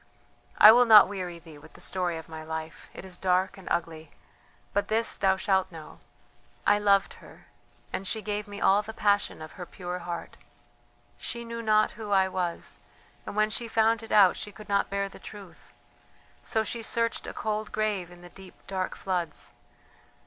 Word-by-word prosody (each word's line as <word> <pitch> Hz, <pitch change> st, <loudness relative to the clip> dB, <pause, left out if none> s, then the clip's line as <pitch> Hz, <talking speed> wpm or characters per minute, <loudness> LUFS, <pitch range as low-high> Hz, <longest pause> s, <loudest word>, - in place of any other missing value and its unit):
"I 215 Hz, -, +11 dB
will 245 Hz, +2 st, +6 dB
not 215 Hz, -3 st, +9 dB
weary 185 Hz, -3 st, -5 dB
thee 160 Hz, -3 st, -14 dB
with -, -, -16 dB
the -, -, -15 dB
story 180 Hz, -3 st, -2 dB
of 160 Hz, -, -9 dB
my 160 Hz, -1 st, -8 dB
life; 160 Hz, 0 st, -7 dB
it -, -, -10 dB
is 180 Hz, -2 st, -10 dB
dark 185 Hz, +1 st, +1 dB
and 195 Hz, -2 st, -14 dB
ugly, 160 Hz, -2 st, -2 dB, 0.6 s
but 205 Hz, -, 0 dB
this 225 Hz, +1 st, +1 dB
thou 190 Hz, -1 st, +2 dB
shalt 190 Hz, -1 st, +1 dB
know: 160 Hz, -2 st, -11 dB, 0.7 s
I 205 Hz, -, +4 dB
loved 200 Hz, -1 st, +3 dB
her, -, -, -16 dB, 0.5 s
and 195 Hz, -, -3 dB
she 220 Hz, +2 st, -3 dB
gave 210 Hz, 0 st, -3 dB
me 205 Hz, 0 st, -8 dB
all 200 Hz, +2 st, +4 dB
the 220 Hz, +1 st, -9 dB
passion 205 Hz, -6 st, +1 dB
of 155 Hz, -, -10 dB
her 180 Hz, -, -8 dB
pure 180 Hz, -1 st, -6 dB
heart. 175 Hz, -1 st, -6 dB, 0.8 s
She 235 Hz, 0 st, -5 dB
knew 230 Hz, 0 st, -5 dB
not 215 Hz, -1 st, +3 dB
who 215 Hz, -1 st, -8 dB
I 190 Hz, -1 st, +4 dB
was, 180 Hz, -2 st, -4 dB, 0.5 s
and -, -, -6 dB
when 215 Hz, 0 st, +2 dB
she 235 Hz, +2 st, -3 dB
found 225 Hz, 0 st, +2 dB
it 225 Hz, -, -10 dB
out 195 Hz, -3 st, +6 dB
she 210 Hz, -, -6 dB
could 210 Hz, +2 st, -13 dB
not 200 Hz, 0 st, +1 dB
bear 200 Hz, 0 st, -1 dB
the 195 Hz, -, -13 dB
truth, 200 Hz, -4 st, -12 dB, 0.7 s
so 220 Hz, -, 0 dB
she 230 Hz, +2 st, -4 dB
searched 230 Hz, +1 st, -1 dB
a -, -, -4 dB
cold 215 Hz, 0 st, -3 dB
grave 215 Hz, -4 st, -1 dB
in 175 Hz, 0 st, -15 dB
the 175 Hz, -, -11 dB
deep, 190 Hz, 0 st, -14 dB
dark 190 Hz, -1 st, -3 dB
floods. 180 Hz, -3 st, -4 dB
195 Hz, 190 wpm, -27 LUFS, 180-215 Hz, 0.8 s, I